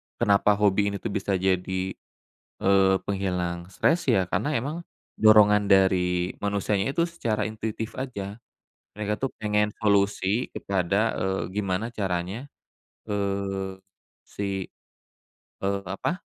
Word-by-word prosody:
kenapa 100 0 +3
hobi 100 0 +3
ini - - -3
tuh 115 - -2
bisa 100 0 -1
jadi, 95 0 0 0.7
eee, 95 0 +5
penghilang 90 -3 -2
stres 165 - +1
ya 115 -7 +4
karena 150 +9 0
emang, 140 +7 -2 0.4
dorongan 105 -1 +6
dari 90 -2 +3
manusianya 100 +4 0
itu 170 - +3
secara 120 -11 -1
intuitif 110 +1 -4
aja, 105 -5 -5 0.5
mereka 105 0 -2
tuh 135 +4 -2
pengen 105 0 +1
solusi 100 +1 +1
kepada, 100 +3 0
eee, 95 0 -1
gimana 100 +1 -1
caranya, 95 +3 -2 0.6
eee, 100 -2 -2 0.5
si, 100 -2 -3 1.0
eee, 100 0 0
apa, 165 - -2
100 Hz, 115 wpm, -26 LUFS, 95-105 Hz, 1.0 s, dorongan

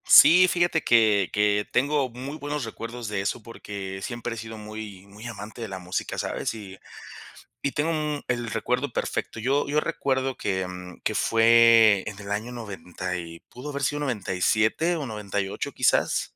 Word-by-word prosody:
Sí, 180 +3 +9
fíjate 175 -2 +1
que 110 -5 +4
que 105 0 +2
tengo 140 +1 +2
muy 130 +5 -7
buenos 145 -1 -3
recuerdos 115 +1 -6
de 105 -2 -2
eso, 100 +4 -2
porque 100 -4 -7
siempre 120 +2 -4
he - - -8
sido 110 0 -7
muy 105 -2 -8
muy 105 +3 -12
amante 110 0 -8
de 115 - -3
la 95 -2 -6
música, 90 +1 -4
¿sabes? - - -2
Y 95 -3 -10 0.8
y 140 - 0
tengo 150 +4 0
un 150 -2 -2
el 120 -1 -1
recuerdo 125 +3 -1
perfecto. 115 - -3
Yo 135 +6 +1
yo 145 +2 +2
recuerdo 135 -4 -1
que, 95 -4 -2
mm, 90 -1 -9
que - - -1
fue 115 -3 +6
en 105 -1 -6
el 100 -1 -8
año 110 +4 -2
90 90 -5 -5
y, 85 -1 -8
pudo 130 +4 -8
haber 140 -1 -4
sido 145 +2 0
97, 110 - +1
o 150 - -3
98, 100 -4 -3
quizás. - - +1
115 Hz, 170 wpm, -26 LUFS, 100-135 Hz, 0.8 s, Sí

